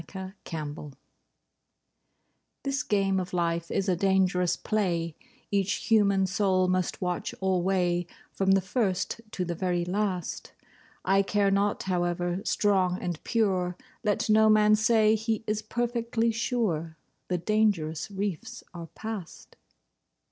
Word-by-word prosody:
LIFE'S 190 0 -6
TRACK 155 -3 -5 1.9
This 275 +1 -1
game 195 -4 +1
of 185 0 -5
life 170 -1 0
is 195 - -1
a 185 - +3
dangerous 185 -1 +2
play, 170 -7 -1 0.4
Each 200 -1 +1
human 200 -4 +3
soul 185 -1 +2
must 185 -1 0
watch 180 -1 -2
alway, 180 -2 +1 0.2
From 195 0 +2
the 195 - +4
first 190 +1 -1
to 185 -3 -3
the 175 - -2
very 175 0 -1
last. 185 -1 -2 0.5
I 195 +1 +4
care 200 0 +1
not 200 +1 +1
however 175 0 -1
strong 190 -3 +2
and 175 -3 -4
pure— 185 -6 0 0.3
Let 210 -2 0
no 220 0 +5
man 215 0 +6
say 220 0 +4
he 220 0 -1
is 215 -1 -1
perfectly 235 0 -1
sure 205 - -1 0.3
The 180 - 0
dangerous 175 -5 0
reefs 195 -4 -4
are 170 -2 -7
past. 215 -6 -7
190 Hz, 125 wpm, -28 LUFS, 180-215 Hz, 1.9 s, man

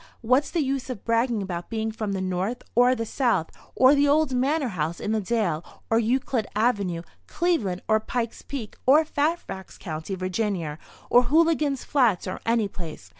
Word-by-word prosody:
What's 255 +5 +2
the 335 -4 0
use 270 -1 -2
of 240 -6 -6
bragging 230 -2 +1
about 175 -2 -5
being 220 -1 -2
from 215 -2 -3
the 190 - -2
North, 190 +6 -2
or 245 +2 +5
the 230 -2 -3
South, 225 - 0 0.2
or 260 +2 +6
the 290 0 +4
old 295 -1 +3
manor 270 +2 +1
house 165 -3 -3
in 210 - -2
the 220 -1 +1
dale, 190 -6 0 0.3
or 225 - +4
Euclid 235 -1 0
avenue, 205 -7 +1 0.2
Cleveland, 235 - 0
or 220 0 +4
Pike's 230 +1 -3
Peak, 250 -7 -7
or 300 +4 +6
Fairfax 295 - -2
County, 160 +1 -5
Va., 185 -4 -2 0.3
or 245 - +7
Hooligan's 305 -3 +2
Flats 245 -10 +2
or 185 - -5
any 230 -2 +2
place? 165 - -9
230 Hz, 175 wpm, -25 LUFS, 190-265 Hz, 0.3 s, or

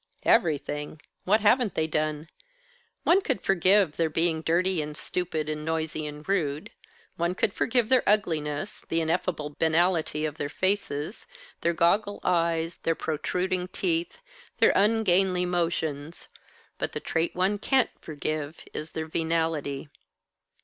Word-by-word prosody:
"Everything. 150 - +1 0.3
What 215 +4 +4
haven't 230 +1 +3
they 160 - +1
done? 155 0 -2 0.8
One 375 +3 +5
could 265 - -1
forgive 190 -2 +3
their 165 -1 +2
being 160 +1 +1
dirty 175 +2 +1
and 150 0 -6
stupid 160 -1 -2
and 150 0 -3
noisy 160 -1 -2
and 150 +2 -9
rude; 155 -7 -1 0.5
one 170 +2 0
could 195 - 0
forgive 240 -2 +1
their 260 0 +4
ugliness, 165 -3 0
the 165 - +1
ineffable 160 -2 -1
banality 160 -1 +2
of 150 0 -4
their 145 -3 -3
faces, 185 -1 -2 0.3
their 170 - +1
goggle 200 +5 +2
eyes, 165 -1 +1
their 165 - 0
protruding 180 +4 -1
teeth, 180 - -2 0.3
their - - +5
ungainly 195 -4 +3
motions; 165 -3 -2 0.5
but - - -2
the - - -3
trait 165 +1 -1
one 190 +3 +1
can't 265 +4 +2
forgive 155 0 -4
is 155 +1 -6
their 160 0 -3
venality. 160 -3 -1
165 Hz, 135 wpm, -27 LUFS, 155-185 Hz, 0.8 s, One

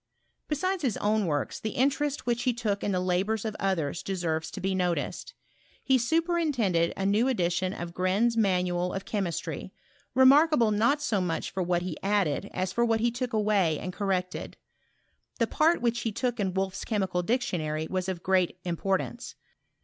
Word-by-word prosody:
Besides 370 +5 -1
his 255 -8 0
own 210 -1 +1
works, 145 -3 -2
the 220 - -4
interest 280 +2 +1
which 240 0 0
he 250 0 +1
took 210 -4 -2
in 205 - 0
the 185 - +1
labours 190 +4 0
of 215 -1 -3
others 175 -5 -1
deserves 165 -4 -2
to - - -7
be 190 +1 -1
noticed. 180 -2 -2 0.5
He 265 -1 +3
superintended 275 - +1
a 195 - -1
new 210 +5 +3
edition 185 -6 0
of 175 -3 -6
Gren's 195 +7 +1
Manual 180 -4 +1
of 195 - -4
Chemistry, 195 -6 -3 0.4
remarkable 265 -2 +6
not 235 +8 +2
so 205 -8 +1
much 165 -3 -2
for 190 - -2
what 175 -1 0
he 180 -3 -5
added 200 -3 0
as 185 0 -2
for 235 - +2
what 225 -1 +2
he 235 +1 +2
took 245 +1 -3
away 205 -7 +2
and 180 +3 -5
corrected. 185 -3 -2 0.8
The - - +2
part 325 -3 +2
which 235 0 +1
he 225 - -2
took 245 +2 -2
in 190 -2 -1
Wolff's 190 0 -2
Chemical 190 -5 -1
Dictionary 170 -8 -1
was 185 +1 -2
of 180 -2 -4
great 185 -2 +2
importance. 190 +6 -2
195 Hz, 170 wpm, -28 LUFS, 180-240 Hz, 0.8 s, remarkable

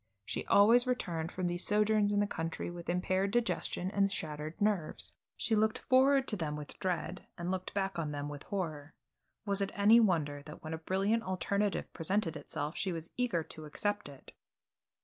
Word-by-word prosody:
She - - -4
always 230 +5 +6
returned 170 -10 -1
from 185 - -3
these 175 0 +1
sojourns 210 0 +3
in 205 0 +2
the - - +3
country 165 -3 -4
with 170 -1 -8
impaired 185 +2 +1
digestion, 220 -4 0
and 200 -1 +2
shattered 155 0 -4
nerves. 205 -7 -1 0.2
She 225 - 0
looked 215 0 +2
forward 270 +1 +4
to 215 - 0
them 155 -6 -2
with 150 -1 -9
dread 180 0 -2
and 175 +1 -2
looked 185 +1 -4
back 195 -3 -1
on 155 -2 -2
them 145 0 -3
with 145 -1 -7
horror. 155 -6 -4 0.5
Was 200 -1 +1
it 200 - 0
any 210 +3 +7
wonder 155 -9 +2
that 150 - -10
when 155 0 -5
a 160 - -4
brilliant 195 +7 +1
alternative 200 +1 -1
presented 175 0 0
itself 150 +1 -4
she 190 - -1
was 165 -1 -5
eager 240 -10 0
to 155 -1 -10
accept 205 +7 -2
it? 140 -2 -13
185 Hz, 185 wpm, -33 LUFS, 160-205 Hz, 0.5 s, any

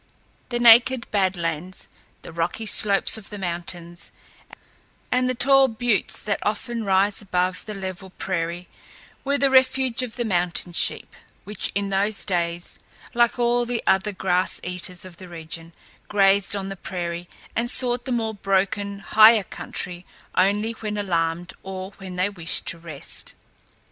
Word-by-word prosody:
The 240 - -1
naked 240 +1 +6
Bad 190 -3 +1
Lands, 170 +2 -3 0.4
the - - -9
rocky 170 +6 -2
slopes 205 0 +4
of 205 - -10
the 205 - -7
mountains, 175 -1 -5 1.0
and 255 0 +2
the 255 - 0
tall 270 +2 +5
buttes 235 -1 0
that 205 -1 -2
often 230 +2 -2
rise 195 +1 +2
above 185 -1 -1
the 210 - -5
level 190 0 -6
prairie 175 -1 -3 0.6
were 280 +1 +1
the 275 -1 +2
refuge 260 -1 +4
of 250 -3 -4
the 240 -2 -2
mountain 175 -3 -1
sheep, - - -1 0.3
which 210 +1 -3
in 200 0 0
those 200 +2 0
days, 175 -2 -1 0.3
like 240 0 +3
all 240 0 +2
the 240 -1 -3
other 195 +2 +2
grass 185 -1 0
eaters 180 0 -5
of 180 -3 -11
the 185 - -10
region, 165 0 -6 0.4
grazed 200 0 +3
on 195 -1 -4
the 195 - -5
prairie 175 -1 -5 0.3
and 235 +1 0
sought 245 -1 +1
the 260 - -3
more 225 -2 -1
broken, 200 0 -1
higher 220 +1 +6
country 180 -1 -5 0.3
only 205 +4 +2
when 215 -2 -5
alarmed 170 -3 -1
or 190 0 -6
when 190 -2 -8
they 185 +2 +1
wished 175 -5 -2
to 170 - -1
rest. 160 -4 -4
195 Hz, 155 wpm, -23 LUFS, 180-225 Hz, 1.0 s, naked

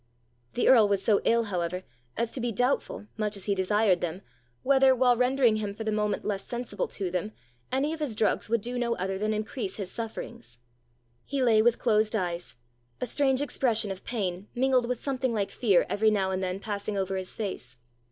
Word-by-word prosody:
The 245 - +1
earl 225 -5 +7
was 200 -1 +1
so 205 0 +3
ill, 230 0 +3
however, 180 -3 -3 0.3
as 230 0 -1
to 260 - -5
be 240 0 -1
doubtful, 245 0 -1
much 210 -1 +1
as 195 - -5
he 205 - +1
desired 195 -1 +2
them, 175 +3 -4 0.4
whether, 265 -1 +5
while 250 -1 +4
rendering 250 -2 +3
him 205 -2 -3
for 220 - -5
the 220 - -1
moment 210 0 -1
less 195 -2 -2
sensible 240 -4 -3
to 190 -3 -3
them, 185 +4 -2 0.4
any 275 +4 0
of 325 - -6
his 285 -8 -2
drugs 215 0 +1
would 230 -1 +1
do 245 +3 -3
no 235 -1 0
other 190 +1 -3
than 215 +1 0
increase 215 -1 -3
his 195 -3 -5
sufferings. 230 - -7 0.7
He 275 -2 -1
lay 225 -3 +5
with 235 +1 +3
closed 215 -1 +2
eyes, 175 - -3 0.4
a - - -1
strange 265 +1 +1
expression 235 -7 0
of 190 - -7
pain 195 -4 -3
mingled 255 -1 +2
with 250 -1 -2
something 260 -3 -1
like 200 -2 -1
fear 200 -7 +3
every 220 +1 +2
now 195 -3 +1
and 190 0 -1
then 185 0 -2
passing 205 0 -4
over 190 0 -1
his 185 -1 -3
face. 155 - -5
215 Hz, 200 wpm, -28 LUFS, 195-245 Hz, 0.7 s, earl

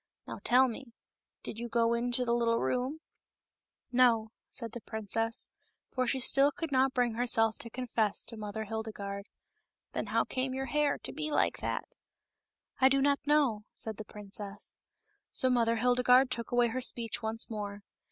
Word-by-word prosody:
Now - - -7
tell 255 +2 +5
me, 240 0 -8 0.5
did 225 - -6
you 240 0 -5
go 230 0 +2
into 245 +1 +1
the 235 - +1
little 230 -1 +2
room 255 +7 -1 0.3
?" - - -56
" - - -54
No," 235 -3 +4 0.2
said 230 -3 -4
the 240 - -7
princess, 225 +2 -2 0.4
for 255 -1 0
still 275 +2 +5
she - - -12
could 325 -3 -3
not 265 0 +3
bring 245 -2 +2
herself 225 -2 +2
to 230 - 0
confess 230 -4 -1
to 230 - -3
Mother 215 0 -5
Hildegarde. 205 -2 -5 0.4
" - - -59
Then - - -2
how - - +2
came 260 0 -2
your 265 0 -2
hair 295 0 +1
to - - -7
be 305 +1 -2
like 295 - +1
that - - -4 0.3
?" - - -59
" - - -30
I 265 - +7
do 275 0 +3
not 280 +1 +3
know," 275 -9 +3
said 220 -2 -6
the 215 - -7
princess. 205 0 -9 0.6
So 255 - +2
Mother 230 -2 +3
Hildegarde 250 +2 +4
took 235 -2 -2
away 245 -1 +3
her 255 +3 -3
speech 235 -2 -3
once 220 0 -1
more. 205 -2 -5
235 Hz, 185 wpm, -31 LUFS, 220-255 Hz, 0.6 s, I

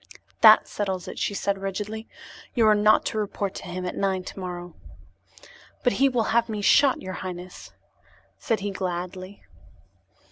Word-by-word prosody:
"That 220 -1 +8
settles 190 -3 -3
it," - - -7
she 200 - -1
said 200 0 -1
rigidly. 210 +3 -5 0.5
"You 230 -3 +4
are 215 - +6
not 210 +1 +4
to 220 - -2
report 200 -1 -3
to - - -8
him 180 +1 -5
at 180 - -4
nine 190 -2 -1
tomorrow." 175 -2 -7 1.1
"But 245 - +3
he 275 +1 +3
will 240 -4 0
have 235 0 +2
me 210 -2 -4
shot, 280 +5 +4
your 185 0 -5
highness," 180 -1 -8 0.7
said 225 -4 -1
he 205 0 -2
gladly. 185 +1 -5
200 Hz, 155 wpm, -25 LUFS, 185-215 Hz, 1.1 s, That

